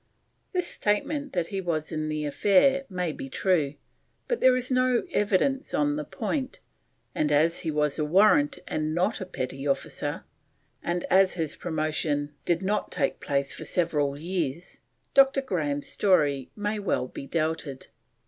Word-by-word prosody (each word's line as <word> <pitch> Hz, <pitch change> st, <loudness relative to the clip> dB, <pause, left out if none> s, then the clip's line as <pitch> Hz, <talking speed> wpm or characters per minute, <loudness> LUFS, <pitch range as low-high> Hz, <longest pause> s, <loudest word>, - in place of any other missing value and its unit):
This 360 Hz, -2 st, 0 dB
statement 285 Hz, +7 st, -1 dB
that 175 Hz, -2 st, 0 dB
he 195 Hz, -, -1 dB
was 160 Hz, -3 st, -2 dB
in 155 Hz, -1 st, -2 dB
the 155 Hz, 0 st, -2 dB
affair 210 Hz, -, +3 dB
may 180 Hz, -3 st, -2 dB
be 135 Hz, -, -7 dB
true, 150 Hz, -3 st, +1 dB, 0.5 s
but 485 Hz, -, -1 dB
there 260 Hz, 0 st, +6 dB
is 255 Hz, +1 st, -2 dB
no 255 Hz, -1 st, +3 dB
evidence 210 Hz, +6 st, +1 dB
on 145 Hz, -1 st, +2 dB
the 150 Hz, -, -3 dB
point, 260 Hz, -, -3 dB, 0.5 s
and 150 Hz, -1 st, 0 dB
as 160 Hz, +3 st, +3 dB
he 165 Hz, -, -3 dB
was 150 Hz, -1 st, 0 dB
a -, -, +2 dB
warrant 215 Hz, -, +4 dB
and 155 Hz, 0 st, -2 dB
not 185 Hz, +5 st, 0 dB
petty 135 Hz, +2 st, -4 dB
officer, 140 Hz, -, -2 dB, 0.6 s
and 175 Hz, 0 st, -2 dB
as 190 Hz, 0 st, +5 dB
his 160 Hz, -4 st, -2 dB
promotion 155 Hz, -3 st, -1 dB
did 175 Hz, +1 st, +1 dB
not 210 Hz, +2 st, -1 dB
take 140 Hz, -5 st, 0 dB
place 140 Hz, -1 st, -1 dB
for -, -, -7 dB
several 150 Hz, -5 st, 0 dB
years, 170 Hz, -1 st, -3 dB, 0.3 s
Dr. 275 Hz, 0 st, +5 dB
Grahame's 150 Hz, -, -2 dB
story 145 Hz, -9 st, +2 dB
may 210 Hz, 0 st, -2 dB
well 195 Hz, -10 st, 0 dB
be 135 Hz, -, -8 dB
doubted. 155 Hz, -3 st, -2 dB
170 Hz, 155 wpm, -27 LUFS, 150-210 Hz, 0.6 s, there